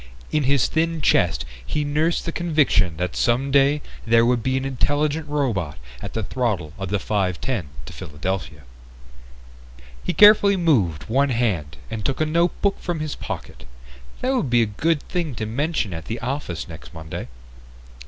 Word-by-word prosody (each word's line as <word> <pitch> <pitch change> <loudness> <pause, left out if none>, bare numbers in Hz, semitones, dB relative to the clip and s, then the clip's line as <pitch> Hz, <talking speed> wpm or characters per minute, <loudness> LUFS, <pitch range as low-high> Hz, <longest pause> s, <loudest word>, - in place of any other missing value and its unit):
In 150 -3 +1
his 140 -2 +3
thin 165 0 0
chest 85 - +2 0.2
he 150 - -2
nursed 155 +4 0
the 165 - -2
conviction 150 - +2
that 90 +1 -2
someday 140 +4 +3 0.2
there 115 0 +4
would 120 -1 +2
be 130 +3 0
an 135 - -2
intelligent 145 +3 0
robot 115 - -1 0.2
at - - -6
the 110 - -2
throttle 100 -9 -2
of 95 -2 -3
the 105 - +1
5:10 100 +1 -1 0.2
to - - -9
Philadelphia. 75 -1 -4 1.4
He - - -1
carefully 205 -1 +7
moved 105 - +2
one 135 - +1
hand 95 - -1
and 110 -2 -4
took 135 - -1
a 155 - +3
notebook 170 +5 +1
from 175 -2 -3
his 155 -1 -3
pocket. - - -7 0.6
That 260 +1 +1
would 240 - 0
be 120 -1 +4
a - - +2
good 150 +9 0
thing 170 -8 -3
to 110 - -3
mention 125 - -1
at 80 0 -6
the 115 +1 -4
office 125 - -4
next 80 0 -11
Monday. 80 -5 -6
125 Hz, 165 wpm, -23 LUFS, 95-150 Hz, 1.4 s, carefully